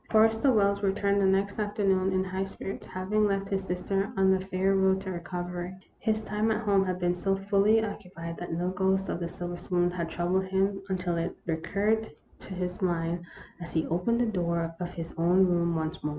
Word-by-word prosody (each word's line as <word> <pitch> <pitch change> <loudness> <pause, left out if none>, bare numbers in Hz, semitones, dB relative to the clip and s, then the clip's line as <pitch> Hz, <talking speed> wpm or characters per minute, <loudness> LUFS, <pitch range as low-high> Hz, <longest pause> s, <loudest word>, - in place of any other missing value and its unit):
Forrester 225 +4 +4
Wells 200 -3 +3
returned 200 0 +2
the 195 - +4
next 195 +2 +1
afternoon 195 -2 +1
in 185 0 +1
high 190 +1 -2
spirits, 195 0 -7
having 210 +3 +1
left 195 0 -1
his 195 -1 -1
sister 195 +2 -1
on 190 0 +5
the 190 - +3
fair 190 0 +1
road 190 0 +3
to 190 -1 -5
recovery. 175 +1 -5 0.2
His 220 0 0
time 210 +2 0
at 220 +1 0
home 200 -2 +3
had 185 -1 -2
been 175 -1 +1
so 195 +2 0
fully 200 +3 +3
occupied 180 -5 -7
that 175 - -6
no 175 +2 -1
ghost 190 +1 +1
of - - -2
the 170 -1 -3
silver 175 0 -5
spoon 175 0 0
had 170 -2 -3
troubled 180 +3 0
him 195 +1 0
until 180 -2 -1
it 170 +1 -2
recurred 200 +7 0 0.3
to 190 - -8
his 180 +2 -4
mind 170 -1 0 0.4
as 170 - -7
he 160 - +1
opened 180 +8 +1
the 245 - +3
door 170 -5 -1
of 175 -1 -3
his 165 -2 -7
own 180 +3 +5
room 170 -1 +1
once 160 0 -3
more. 150 - 0
190 Hz, 205 wpm, -28 LUFS, 175-200 Hz, 0.4 s, on